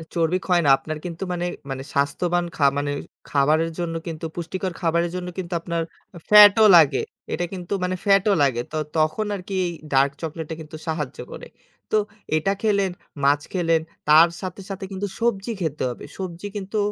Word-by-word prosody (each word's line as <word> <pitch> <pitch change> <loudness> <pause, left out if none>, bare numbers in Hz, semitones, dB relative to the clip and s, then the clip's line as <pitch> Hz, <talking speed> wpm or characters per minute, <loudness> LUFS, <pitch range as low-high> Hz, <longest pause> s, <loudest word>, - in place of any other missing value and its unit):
চর্বি 170 +1 +2
ক্ষয় 180 -2 +3
না। - - +4
আপনার 155 +2 -6
কিন্তু 170 0 -5
মানে 175 0 -2 0.2
মানে 135 0 -4
স্বাস্থ্যবান 175 +5 +1 0.3
মানে 145 0 -1 0.4
খাবারের 155 +4 +2
জন্য 170 -1 -2
কিন্তু 165 -1 -5
পুষ্টিকর 180 +2 -3
খাবারের 170 0 +1
জন্য 180 0 -4
কিন্তু 180 -1 -4
আপনার 170 -1 -2 0.5
ফ্যাটও 210 +1 +9
লাগে। 155 -4 +5 0.3
এটা 175 - -1
কিন্তু 180 0 -5
মানে 180 0 0
ফ্যাটও 200 0 +4
লাগে। 125 -4 +1 0.4
তখন 155 +7 +1
আরকি 195 0 -7
এই - - -1 0.2
ডার্ক 135 +1 +4
চকোলেট 160 0 -4
টা 160 - -4
কিন্তু 155 0 -10
সাহায্য 150 -4 -3
করে। - - -9 0.4
তো 215 - +4 0.4
এটা 195 +6 +1
খেলেন, 200 -4 +2 0.3
মাছ 145 +1 +4
খেলেন, 165 -3 +2 0.3
তার 160 +3 +8
সাথে 185 +1 -6
সাথে 195 0 -5
কিন্তু 195 +1 -3
সবজি 230 -2 0
খেতে 155 -3 -2
হবে। 120 - -8
সবজি 185 0 -5
কিন্তু 205 +2 -4
175 Hz, 165 wpm, -23 LUFS, 155-190 Hz, 0.5 s, ফ্যাটও